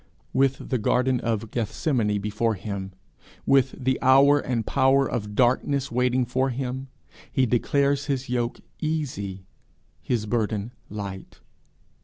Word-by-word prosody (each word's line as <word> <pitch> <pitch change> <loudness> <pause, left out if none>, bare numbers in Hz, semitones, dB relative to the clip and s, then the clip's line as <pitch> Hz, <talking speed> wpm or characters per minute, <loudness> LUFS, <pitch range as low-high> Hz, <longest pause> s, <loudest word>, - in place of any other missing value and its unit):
With 135 0 +1
the 130 - +1
garden 125 +3 +2
of 115 -2 -2
Gethsemane 110 -1 0
before 105 +2 0
him, 95 -1 -5 0.5
with 135 -1 +3
the 130 -1 -1
hour 135 +2 +6
and 125 -4 -1
the - - -9
power 135 0 +3
of 105 -3 -4
darkness 130 +3 +2
waiting 125 +1 +2
for 130 +3 0
him, 130 +1 -4 0.4
he 130 - +2
declares 140 +4 +1
his 135 -2 -2
yoke 120 -1 -1 0.2
easy, 115 -12 -3 0.6
his 115 -4 -1
burden 110 0 -1 0.2
light. 100 -2 -7
125 Hz, 130 wpm, -25 LUFS, 110-135 Hz, 0.6 s, hour